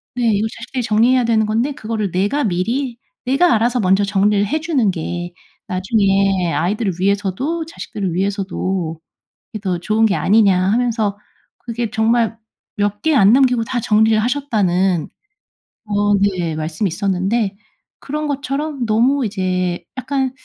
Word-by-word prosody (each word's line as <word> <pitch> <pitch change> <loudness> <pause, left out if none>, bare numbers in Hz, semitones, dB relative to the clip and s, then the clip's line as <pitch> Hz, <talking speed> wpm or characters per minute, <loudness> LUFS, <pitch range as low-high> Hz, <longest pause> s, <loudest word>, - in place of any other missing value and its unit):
네. 235 -3 +2
"이거 210 +2 0
자식들이 245 +2 -4
정리해야 240 +4 +3
되는 220 -2 +2
건데 230 +7 0
그거를 215 - -3
내가 205 +11 0
미리 235 +7 -1 0.3
내가 275 +8 +3
알아서 240 +3 +1
먼저 195 0 +3
정리를 200 +1 +2
해 310 +2 -1
주는 280 - +1
게 175 +1 -5 0.3
나중에 195 -1 +1
아이들을 195 +3 0
위해서도 200 - -1
자식들을 210 - -5
위해서도 190 -3 -2 0.5
이게 215 - -5
더 185 -4 -2
좋은 215 +5 +2
게 200 - +1
아니냐." 200 -3 +4
하면서 220 -2 0 0.4
그게 235 -1 -4
정말 225 -1 +1 0.4
"몇 205 0 -1
개 320 -1 +2
안 200 -1 +6
남기고 250 -3 +3
다 240 +1 -2
정리를 220 +1 +3
하셨다."는 195 - 0 0.8
어 205 0 +1
네 180 -5 0
말씀이 155 +5 -2
있었는데 195 +3 -1 0.4
그런 300 +2 -4
것처럼 280 -1 -3
너무 245 +5 +2
이제 185 -4 -2
약간 265 -1 -1
215 Hz, 310 characters per minute, -18 LUFS, 190-245 Hz, 0.8 s, 안